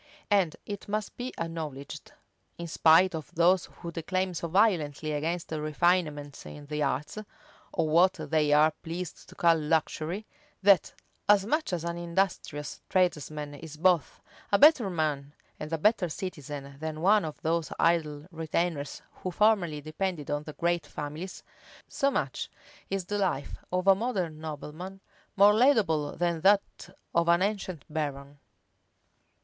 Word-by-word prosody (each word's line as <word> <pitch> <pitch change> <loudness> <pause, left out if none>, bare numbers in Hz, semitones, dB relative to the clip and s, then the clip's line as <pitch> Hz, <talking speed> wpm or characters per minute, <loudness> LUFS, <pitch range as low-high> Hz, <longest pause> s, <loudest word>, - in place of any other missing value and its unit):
And 190 -6 +3
it 205 -1 -6
must 210 0 -3
be 250 +1 -4
acknowledged, 150 -4 -6 0.5
in 170 - -5
spite 170 +3 +5
of 155 -4 -5
those 175 +2 +4
who 170 -1 -9
declaim 185 +3 -2
so 170 0 -3
violently 160 -6 +2
against 160 +4 -2
refinement 155 -1 0
in 145 -1 -10
the 150 +1 -3
arts, 150 +8 -1 0.5
or 165 -3 0
what 175 +4 +5
they 155 -2 0
are 150 +1 +6
pleased 175 +1 -6
to - - -14
call 170 -1 +4
luxury, 160 +4 -1 0.4
that, 195 -4 +5 0.3
as 205 -2 +6
much 305 +5 0
as 175 -3 -2
an 170 0 -3
industrious 170 -4 -2
tradesman 150 -5 0
is 155 +1 -10
both 175 -1 +2 0.3
a 200 - +5
better 280 -7 +6
man 150 -4 -2 0.3
and 150 +1 -6
a 165 - 0
better 200 +1 +2
citizen 145 -6 -6
than 155 0 -4
one 205 +3 +5
of 155 -2 -6
those 165 0 0
idle 155 -3 +1
retainers 160 -2 -2
who 185 - -4
formerly 180 -6 +2
depended 155 0 -3
on 145 0 0
the 150 - -7
great 170 +1 0
families, 155 +6 -6 0.4
so 275 - +1
much - - -2 0.4
is 195 -2 -2
the 205 +2 -2
life 175 -8 -1
of 180 0 0
a 195 - +8
modern 190 -7 -2
nobleman 160 +5 -7 0.4
more 205 +1 +7
laudable 210 - +3
than 170 -1 0
that 200 +2 +2 0.2
of 170 0 +2
an 170 +2 +4
ancient 195 -6 -3
baron. 145 -2 -4
170 Hz, 145 wpm, -28 LUFS, 150-190 Hz, 0.5 s, a